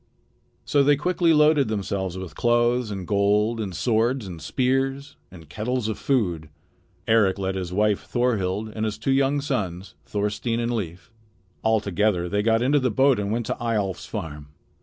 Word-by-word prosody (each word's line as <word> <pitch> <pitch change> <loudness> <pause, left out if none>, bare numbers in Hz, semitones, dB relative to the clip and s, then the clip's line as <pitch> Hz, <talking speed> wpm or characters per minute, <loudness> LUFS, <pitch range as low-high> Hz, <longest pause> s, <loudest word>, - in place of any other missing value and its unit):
So 145 - +3
they 145 +1 +5
quickly 170 +3 +1
loaded 150 -3 +4
themselves 95 -3 -3
with 95 -2 -7
clothes 120 0 +2
and 95 -3 -5
gold 105 +3 +2
and 95 -5 -4
swords 115 +4 +1
and 85 -4 -8
spears 135 +2 -1
and 85 -4 -13
kettles 110 - -2
of 110 - -3
food. 90 - 0 0.6
Eric 110 -4 +3
led 95 -1 -2
his 90 -2 -4
wife 105 +1 +1
Thorhild 110 -4 0
and 110 - -2
his 105 -1 -2
two 120 +5 -1
young 135 +1 +2
sons, 95 - -3
Thorstein 105 +3 -2
and 120 0 -1
Leif. 90 -3 -5 0.5
All 110 0 +3
together 100 -2 0
they 105 +3 0
got 115 +2 +2
into 145 +3 +3
the 130 -1 +1
boat 130 +2 +3
and 100 0 -2
went 115 +1 -1
to - - -3
Eyjolf's 105 -5 -2
farm. 75 -8 -6
110 Hz, 170 wpm, -24 LUFS, 95-125 Hz, 0.6 s, they